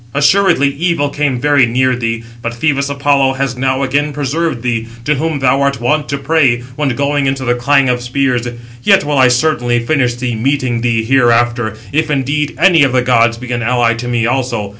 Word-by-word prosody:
Assuredly 145 -1 +3
evil 145 0 -1
came 145 -4 -1
very 145 -2 +3
near 130 +2 +1
thee, 115 -1 -3 0.2
but 115 0 -4
Phœbus 140 +2 -1
Apollo 140 -1 +1
has 135 -2 -3
now 130 +1 -1
again 145 +2 -1
preserved 145 -1 -2
thee, 115 -2 -2 0.2
to 150 - +2
whom 155 +1 -2
thou 135 0 +1
art 140 -2 0
wont 140 +3 -1
to 140 - -2
pray, 140 -4 +1
when 150 -1 -1
going 140 0 0
into 135 -1 -2
the 120 - +2
clang 135 +3 +2
of 125 -1 0
spears. 125 -1 -1 0.3
Yet - - +3
will 145 -1 -1
I 130 - +6
certainly 120 -3 0
finish 125 -3 0
thee, 125 0 -3
meeting 125 0 -1
thee 115 -2 0
hereafter, 120 -2 +1
if 155 +2 0
indeed 145 +1 -1
any 170 -1 +4
of 135 -3 +3
the 125 -1 +2
gods 115 -2 +2
be 125 +1 -8
an 120 -1 -2
ally 120 0 +1
to 115 +1 -6
me 120 -1 0
also. 120 -4 -2
130 Hz, 200 wpm, -14 LUFS, 120-145 Hz, 0.3 s, I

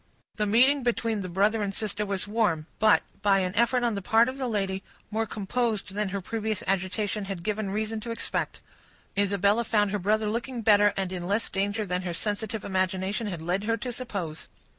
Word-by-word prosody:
The 210 -1 +1
meeting 260 +7 +5
between 230 -3 0
the 185 - -5
brother 205 +5 +2
and 200 -1 -1
sister 210 -1 -2
was 195 0 -1
warm, 205 -8 +1
but, 215 -1 +5 0.2
by 195 -1 +4
an 185 0 -1
effort 240 +3 +3
on 235 -2 +2
the 200 - -3
part 225 +4 +4
of 260 +1 -4
the 260 - -1
lady, 195 -4 -1 0.3
more 220 +1 0
composed 215 -1 -1
than 210 -1 -1
her 200 +1 -3
previous 220 +2 -2
agitation 195 +2 -1
had 195 -3 -5
given 210 0 -1
reason 215 +2 -2
to 230 - -7
expect. 230 - -2 0.5
Isabella 200 +2 +2
found 210 -3 +2
her 205 - 0
brother 215 +3 +1
looking 235 +2 -3
better, 205 -1 +6
and 190 -1 -1
in 175 -1 -4
less 205 +4 0
danger 205 +2 -1
than 180 -1 -1
her 175 -2 -4
sensitive 210 +2 -2
imagination 190 +3 0
had 175 -5 -4
led 180 +4 -1
her 230 +1 +1
to 245 +3 -4
suppose. 195 -11 -5
210 Hz, 200 wpm, -27 LUFS, 195-225 Hz, 0.5 s, better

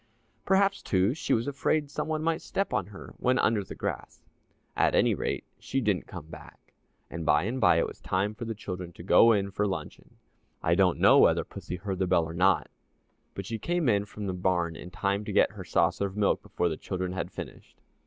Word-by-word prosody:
Perhaps, 195 +1 +3
too, 95 +4 +1
she 160 - -4
was 115 +2 +2
afraid 145 +1 0
some 150 0 -3
one 155 -1 -2
might 165 0 0
step 195 - -2
on 95 - 0
her 100 -2 -11
when 125 +1 +2
under 110 -4 +2
the - - -9
grass. - - -5 0.5
At - - +2
any - - +4
rate, - - -2 0.2
she 135 - -2
didn't 105 - 0
come - - -8
back, 80 - -14 0.4
and 85 0 -5
by 75 0 +3
and 120 +6 -3
by 90 -4 +5
it 85 - +2
was - - -9
time 100 +3 -1
for 115 +2 -7
the 115 0 -4
children 90 -4 -6
to 85 - -11
go 115 +5 +6
in 100 -2 +1
for 105 +1 0
luncheon. 95 - -6 0.5
I 80 - +3
don't 90 -1 +3
know - - +6
whether - - +4
pussy - - -7
heard 95 +1 -4
the 95 - +1
bell 90 -2 +3
or 80 - -7
not, 90 +1 +3 0.7
but 100 - -5
she 115 +2 -4
came 175 0 0
in 100 -3 +2
from 105 0 -7
the 95 - -2
barn 90 -2 0
in 90 - -9
time 100 +2 -1
to 105 - -4
get 100 - +3
her 100 -3 -9
saucer 85 +3 +1
of 95 +1 -10
milk 105 -1 +2
before 90 - -1
the 80 -2 -2
children 95 -1 -4
had 90 - -3
finished. - - -10
100 Hz, 225 wpm, -28 LUFS, 90-115 Hz, 0.7 s, go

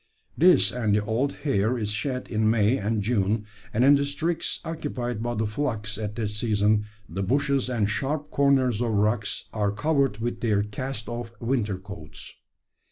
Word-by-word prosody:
This 180 +3 +5
and 110 -4 +1
the 105 0 +1
old 120 +6 0
hair 120 -2 +2
is 105 -2 -2
shed 125 +4 -2
in 110 -1 +1
May 110 +2 +3
and 105 -1 -1
June; 105 -1 +1 0.3
and 120 +4 +3
in 140 - +8
districts 145 +4 0
occupied 130 -8 -3
by 120 +1 -2
the 110 0 0
flocks 105 -3 -2
at 105 -1 -4
that 110 -3 -1
season 105 -1 +1 0.2
the 95 +4 -4
bushes 135 +5 +1
and 115 -5 +1
sharp 140 +7 -2
corners 135 -5 +3
of 115 -2 0
rocks 105 +1 0
are 105 -2 +1
covered 140 0 +1
with 120 +2 -3
their 105 -3 +2
cast 110 +2 -4
off 120 0 -5
winter 115 -5 0
coats. 95 -5 -8
115 Hz, 165 wpm, -26 LUFS, 105-135 Hz, 0.3 s, in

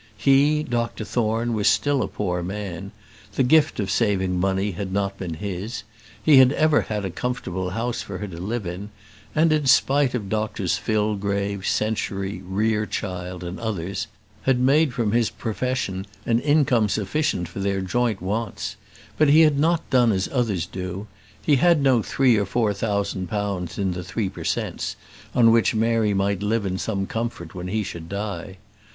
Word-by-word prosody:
He, 140 +6 +4
Dr 120 -5 -2
Thorne, 115 +1 0
was 105 -2 +1
still 135 +7 +3
a - - 0
poor 90 -4 -2
man; 95 0 -5 0.4
the - - +3
gift 155 +2 +4
of 100 -2 -1
saving 95 -5 +1
money 95 +2 +1
had 95 +1 -5
not 100 0 -1
been 85 -4 -4
his; 100 +4 -5 0.4
he 150 -3 +7
had 130 0 +7
ever 155 -1 +3
had 105 -2 -3
a 95 - -3
comfortable 95 -5 -3
house 115 +5 -2
for 95 - -6
her 105 - -5
to 85 -3 -8
live 110 +2 -3
in, 90 +4 -5 0.5
and, 155 +1 +4
in 150 -3 +1
spite 135 0 +4
of 105 -5 -3
Doctors 105 -3 -1
Fillgrave, 100 -2 -1
Century, 100 -2 -1
Rerechild, 95 -3 -2
and 85 +1 -6
others, 100 -4 -3 0.3
had 130 -2 +2
made 140 +3 +4
from 115 -4 -1
his 115 -1 +2
profession 110 -4 -3 0.2
an 115 0 +2
income 130 -7 +3
sufficient 100 - -1
for 90 - -8
their 100 0 0
joint 110 +1 -1
wants; 105 +3 -3 0.4
but 155 -2 +5
he 155 +3 +7
had 150 -3 +4
not 165 +2 +2
done 120 -3 +5
as 95 -2 0
others 110 - 0
do: 95 +2 -5 0.3
he 145 -3 +3
had 170 +3 +4
no 130 -4 +4
three 125 0 +3
or 100 - +1
four 110 0 +1
thousand 100 -3 -2
pounds 100 -3 -3
in 95 -2 0
the 90 0 -4
Three 100 +2 -2
per - - -9
Cents. - - -2 0.4
on 115 -2 +6
which 115 0 +3
Mary 110 -2 +2
might 100 0 0
live 105 +1 0
in 95 -1 -2
some 100 -3 -1
comfort 110 -7 -4
when 90 0 -6
he 105 +3 -1
should 85 -3 -7
die. 100 -1 -5
105 Hz, 175 wpm, -23 LUFS, 95-120 Hz, 0.5 s, he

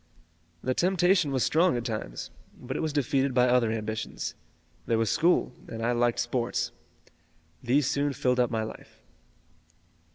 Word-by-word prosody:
"The 130 - +1
temptation 180 0 +3
was 130 -2 +1
strong 165 -3 +3
at 120 - -4
times, 110 - -5 0.3
but 130 +1 -6
it - - -2
was 160 -1 -1
defeated 140 -2 0
by 125 0 +5
other 120 -2 +3
ambitions. 110 0 -4 0.5
There 115 - +2
was 115 -2 +1
school 170 -6 +2
and 115 0 -4
I 120 - +2
liked 120 0 +1
sports. 120 0 -1 0.9
These 135 +4 +2
soon 140 +2 +1
filled 125 -1 +1
up 125 - +3
my 110 -2 -1
life." 110 - -10
125 Hz, 155 wpm, -28 LUFS, 115-145 Hz, 0.9 s, by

